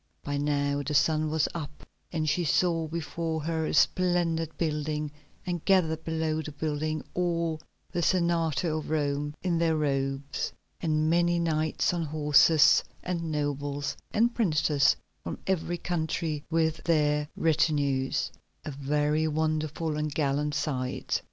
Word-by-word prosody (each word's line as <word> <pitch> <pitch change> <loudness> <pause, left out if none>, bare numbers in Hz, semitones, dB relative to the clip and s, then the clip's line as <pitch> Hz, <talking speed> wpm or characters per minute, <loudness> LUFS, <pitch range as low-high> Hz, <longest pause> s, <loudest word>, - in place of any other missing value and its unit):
By 145 0 -2
now 145 0 0
the 150 +2 -2
sun 155 +2 +3
was 155 0 +1
up 150 -3 -7 0.3
and 155 -2 -1
she 155 +4 +1
saw 165 0 +2
before 160 0 -3
her 160 0 -1
a - - -2
splendid 165 -1 +2
building, 150 -2 -1 0.3
and 175 -2 -3
gathered 160 -5 +2
below 160 -1 -1
the 150 - -7
building 155 +1 -2
all 170 -3 -1 0.3
the 175 - -1
Senate 170 -4 +1
of 155 -3 -2
Rome 145 -1 -1
in 175 -3 +1
their 165 -1 +2
robes, 135 -1 -1 0.3
and 155 -2 +1
many 175 +1 +3
knights 160 0 +1
on 175 - -1
horses, 150 0 +5 0.2
and 170 -3 -2
nobles, 145 -1 -2
and 235 +2 +2
princes 150 - +3 0.3
from 85 - -4
every 175 -2 -1
country 160 -3 -2
with 160 -1 +1
their 150 -3 +2
retinues—a 145 -3 0
very 150 +3 0
wonderful 155 0 -1
and 150 0 -1
gallant 145 0 0
sight. 130 -3 -1
155 Hz, 130 wpm, -28 LUFS, 145-165 Hz, 0.3 s, horses